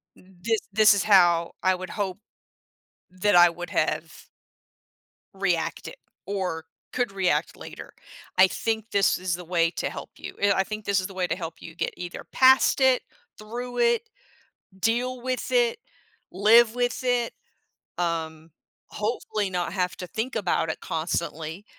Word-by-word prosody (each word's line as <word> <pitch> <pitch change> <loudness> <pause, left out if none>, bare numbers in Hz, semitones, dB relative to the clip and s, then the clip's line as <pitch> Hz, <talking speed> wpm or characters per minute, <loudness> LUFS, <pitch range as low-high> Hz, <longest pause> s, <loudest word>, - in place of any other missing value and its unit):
this 190 +4 -3
this 210 +1 +6
is 200 - 0
how 175 -4 +4
I 185 0 +4
would 185 0 -6
hope 195 -2 -3 0.9
that 185 +2 +1
I 175 0 +8
would 175 +1 -8
have" - - -1 1.2
"reacted, 180 - -2 0.3
or 185 -5 -3 0.3
could 245 -5 -1
react 190 -2 0
later. - - -10 0.5
I 185 0 +8
think 225 +2 -3
this 200 -1 +3
is 180 -1 -2
the 180 - -9
way 165 -1 +1
to - - -2
help - - -8
you. - - -8
Eh, 200 0 +4
I 190 - +1
think 215 +1 -6
this 200 -1 +1
is 185 - -4
the 195 - -10
way 185 -1 0
to - - -1
help 165 -3 -7
you 165 - -10
get - - -2
either 175 0 -7
past 260 +1 +5
it, 260 -1 +4 0.4
through 245 +3 -6
it, 235 - +2 0.7
deal 245 +4 0
with 255 - -3
it, 485 -1 +2 0.5
live 220 +4 +5
with 245 -1 -1
it, 245 -2 0 0.6
um, 160 -2 -3 0.4
hopefully 210 -2 -2
not 180 -1 -2
have 180 -2 -1
to 180 - -6
think 230 +8 -4
about 185 -5 0
it - - -4
constantly," 160 +2 -3
195 Hz, 155 wpm, -25 LUFS, 175-230 Hz, 1.2 s, I